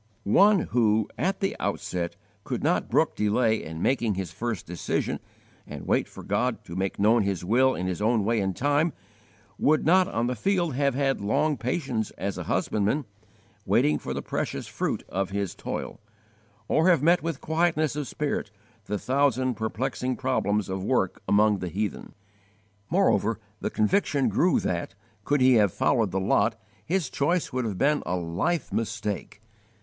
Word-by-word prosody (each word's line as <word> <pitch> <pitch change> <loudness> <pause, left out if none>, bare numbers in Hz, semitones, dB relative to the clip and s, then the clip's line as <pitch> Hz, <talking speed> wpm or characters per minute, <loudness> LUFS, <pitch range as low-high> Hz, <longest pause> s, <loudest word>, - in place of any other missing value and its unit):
One 195 - +5
who, 110 -5 +2
at 190 +1 -1
the 195 - 0
outset, 90 -3 -2 0.3
could - - -4
not - - +1
brook - - +2
delay 110 +2 +1
in 80 +1 -6
making 120 -6 +1
his 95 -4 -4
first 120 -4 -4
decision, 85 +1 -2 0.5
and - - -8
wait - - +1
for - - -11
God - - -1
to 85 - -9
make 95 +1 -2
known 110 +3 +4
His 95 -4 -2
will 130 +6 +3
in 90 - -3
His 90 +1 -3
own 110 -1 +2
way 115 +1 +2
and 95 -2 -1
time, 145 +4 +1 0.7
would 155 +1 +3
not 185 +3 +5
on 120 -11 -1
the 125 - 0
field 175 - 0
have 140 0 +1
had 135 -3 0
long 150 +9 +1
patience 125 -2 -2
as 100 -1 -3
a - - -5
husbandman, 110 +8 0 0.6
waiting 75 0 +2
for - - -6
the - - -3
precious - - -3
fruit - - -3
of 95 0 -2
his 100 -2 -2
toil, - - -5 0.7
or 160 +4 +3
have 165 -6 +4
met 170 +3 +4
with 165 -4 -3
quietness 160 -2 +1
of 150 -2 -3
spirit 145 -7 -2 0.4
the 105 +1 -2
thousand 130 0 +1
perplexing 125 +3 -2
problems 105 -6 0
of 95 0 -3
work 95 -5 0
among 105 0 +4
the 90 - -4
heathen! 105 +4 -4 0.7
Moreover 115 - +2 0.2
the - - -2
conviction 140 - +1
grew 180 +2 +3
that, 85 +1 -3 0.3
could 145 +3 +1
he 130 0 +6
have 100 -3 +3
followed 115 0 +1
the 95 - -1
lot, 110 +4 +1 0.2
his 180 -3 0
choice 160 +5 0
would 130 -1 -1
have 105 -4 -3
been 150 +5 +2
a 90 - 0
life 90 - -2
mistake. 105 -2 -3
115 Hz, 170 wpm, -26 LUFS, 100-145 Hz, 0.7 s, he